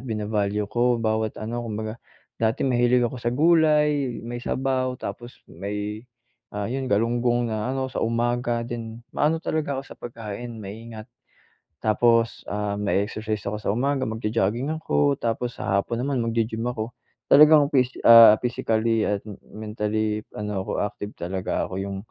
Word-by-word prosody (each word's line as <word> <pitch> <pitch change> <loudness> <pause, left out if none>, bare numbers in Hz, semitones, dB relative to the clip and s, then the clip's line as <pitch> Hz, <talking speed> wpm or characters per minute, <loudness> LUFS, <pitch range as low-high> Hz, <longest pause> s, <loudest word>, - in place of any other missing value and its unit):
bina-value 105 -1 -1
ko 120 0 +3
bawat 110 -1 -1
ano 115 +2 -4
kumbaga. 110 0 -5 0.4
Dati 110 0 +1
mahilig 125 -1 +3
ako 120 +2 -2
sa 120 - -1
gulay, 150 -4 +3
may 120 +1 -5
sabaw, 130 0 -1
tapos, 120 0 -8
may, 105 +3 -5 0.5
ah, 105 - -2
'yon 135 +1 -2
galunggong 120 +2 +1
na 110 +2 -2
ano 130 0 -2
sa - - -2
umaga 120 +1 0
din, 115 -1 -6
maano 155 +2 +2
talaga 150 -3 -1
ako 135 - -3
sa - - -12
pagkain 115 0 -7
maingat. 110 +2 -8 0.8
Tapos, 115 +1 +2
ah, 105 0 -2
mae-exercise 105 +1 -1
ako 105 - -2
sa 100 - -1
umaga 135 +4 0
mag-jo-jogging 110 +2 -1
ako, 75 - +2
tapos 120 +1 -2
sa 95 +1 0
hapon 115 +3 -4
naman 135 0 -1
magi-gym 115 0 -1
ako, 120 -1 -3 0.4
talagang 150 0 +7
pis 130 -3 +4 0.2
ah, 115 -2 +10
physically 115 -2 0
at 105 -1 0
m 105 - -8 0.2
mentally 105 0 -1 0.2
ano 105 -2 -3
ako - - -6
active 105 0 -5
talaga 95 +2 -2
ako - - -7
yung, 100 0 -4
115 Hz, 150 wpm, -24 LUFS, 105-125 Hz, 0.8 s, ah